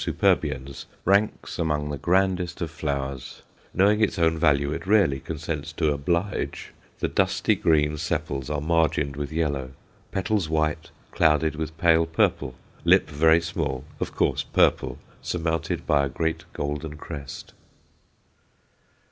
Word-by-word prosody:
superbiens_, 70 -3 0 0.2
ranks 100 +3 +1
among 75 -2 0
the 70 - -3
grandest 90 0 +1
of 85 -3 -3
flowers 70 -4 -4 0.3
knowing 105 +3 +3
its 110 - +2
own 80 -1 +3
value, 70 -2 +2
it 85 +3 -6
rarely 100 -10 +4
consents 80 +1 -5
to 80 -2 +1
"oblige;" 85 +7 -2 0.3
the - - +2
dusky - - +1
green 75 -2 +2
sepals 70 -2 -3
are 75 -1 -1
margined 75 -3 +1
with 70 -1 -4
yellow, 70 -5 -1 0.4
petals 95 -3 0
white, 80 -1 0 0.2
clouded 80 0 +2
with 80 +1 -5
pale 80 -1 +4
purple, 75 -5 0 0.3
lip - - +5
very 80 +3 +5
small, 80 -6 -3 0.2
of - - -4
course, - - +1
purple, - - +2 0.2
surmounted 80 -2 -2
by 70 -1 +3
a - - -3
great 80 +4 -2
golden 75 +1 -4
crest. 70 -3 -8
80 Hz, 130 wpm, -25 LUFS, 70-85 Hz, 0.4 s, lip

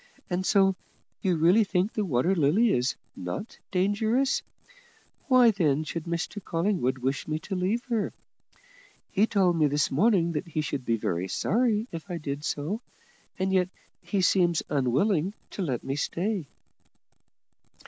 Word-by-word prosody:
And 180 +1 0
so 195 -2 +4 0.5
you 185 -4 +1
really 175 +8 +5
think 195 +1 0
the 215 - 0
Water 165 +1 +1
Lily 190 +8 +3
is 125 +2 +1 0.2
not 90 - -6
dangerous? 215 +8 +1 0.9
Why 255 -4 +6
then 155 -7 +1
should 160 +1 -5
Mr 170 +4 -3
Collingwood 165 -7 0
wish 130 +2 -2
me 155 0 -1
to 190 +5 -5
leave 195 +7 0
her? 230 -5 -1 1.0
He 210 +2 +3
told 185 -6 +2
me 155 - +5
this 145 0 +1
morning 175 - +3
that 150 +1 -3
he 155 -1 -2
should 140 -3 -4
be 115 -1 +1 0.3
sorry 220 - +1
if 165 +3 -7
I 175 - -3
did 145 -2 -5
so, 165 +10 -2 0.6
and 190 0 0
yet 185 -1 +2 0.3
he 200 -3 -1
seems 175 -2 +3
unwilling 150 - +1 0.2
to - - -5
let 130 -10 -2
me 135 - -2
stay." 175 +3 -2
180 Hz, 150 wpm, -27 LUFS, 150-205 Hz, 1.0 s, Why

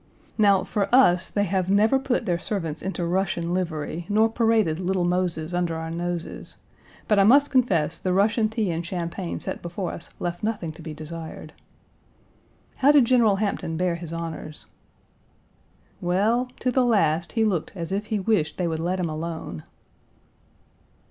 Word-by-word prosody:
Now 200 -3 +4
for 205 -3 -1
us 185 -9 +5
they 205 - 0
have 190 -1 -1
never 215 +7 +4
put 265 -2 -1
their 175 -1 0
servants 165 -8 -3
into 190 -2 -3
Russian 175 -1 -1
livery, 170 -2 -3
nor 215 +2 +4
paraded 225 -8 +2
Little 185 0 0
Moses 175 -2 -1
under 175 -2 0
our 160 0 -5
noses, 175 0 -5 0.5
but 210 -3 +4
I - - +6
must 280 +7 +5
confess 180 - +1
the 185 - -1
Russian 215 +4 +2
tea 220 -4 -1
and 165 +1 -2
champagne 175 0 -4
set - - -5
before 175 +1 -4
us 170 - -8
left 175 0 -3
nothing 210 -7 -2
to 160 - -13
be 155 -1 -7
desired. 160 +1 -8 1.2
"How 275 +2 +5
did 285 -4 +6
General 230 -4 +4
Hampton 195 -5 -2
bear 180 0 +1
his 170 -1 -7
honors?" 165 -2 -6 1.4
"Well, 210 +8 +1
to 255 - +1
the 255 +1 +3
last 170 -8 +2
he 225 -1 +2
looked 185 -7 -1
as 170 -2 -5
if 205 +2 -2
he 215 -1 -1
wished 185 -7 0
they 180 - 0
would 160 -1 -2
let 180 +3 -1
him 175 - 0
alone." 160 - -5
180 Hz, 165 wpm, -24 LUFS, 165-215 Hz, 1.4 s, I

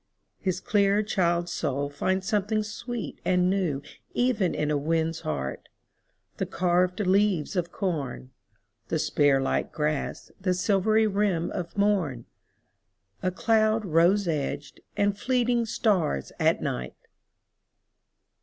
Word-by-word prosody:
His 185 -2 -1
clear 200 +1 +2
child's 175 -4 0
soul 140 +2 -1
finds 185 +6 -1
something 215 +1 +1
sweet 225 +1 -6
and 180 0 +2
newEven 190 - -1
in 150 0 0
a - - +2
weed's 160 +2 0
heart, 65 -3 -4 0.7
the - - -2
carved 180 +1 +1
leaves 195 -3 +2
of 175 -1 -1
corn, 145 - -3 0.6
The - - 0
spear 145 -2 +3
like 135 - -1
grass, 150 -1 -2
the 185 -1 +1
silvery 210 +3 +3
rim 195 -5 0
of 175 +2 -5
morn,A 185 - +1 1.0
cloud 220 +3 +2
rose 175 +4 +3
edged, 145 -2 -3 0.2
and 205 0 +2
fleeting 240 0 +1
stars 185 - 0
at - - +2
night! 60 0 -3
185 Hz, 115 wpm, -27 LUFS, 155-210 Hz, 1.0 s, spear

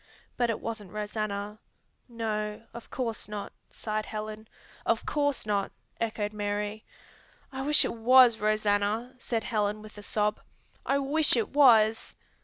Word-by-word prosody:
But 240 -1 +1
it 230 - -1
wasn't 215 -5 -6
Rosanna." 210 0 -4 0.5
"No, 215 -2 -3
of 235 0 -10
course 235 -4 -4
not," 210 -1 -6 0.2
sighed 215 -1 -4
Helen. 215 0 -6 0.4
"Of 230 - 0
course 285 -4 0
not!" 200 -2 0 0.3
echoed 215 -2 -2
Mary. 210 +1 -3 0.7
"I 265 0 -5
wish 295 +2 +5
it - - -2
was 240 0 +6
Rosanna," 215 +2 +1
said 230 -3 -2
Helen 210 -2 -1
with 215 -1 -12
a - - -8
sob. 210 0 0 0.5
"I 275 - +3
wish 285 +2 +3
it 225 - 0
was!" 225 -6 +4
215 Hz, 140 wpm, -28 LUFS, 210-235 Hz, 0.7 s, was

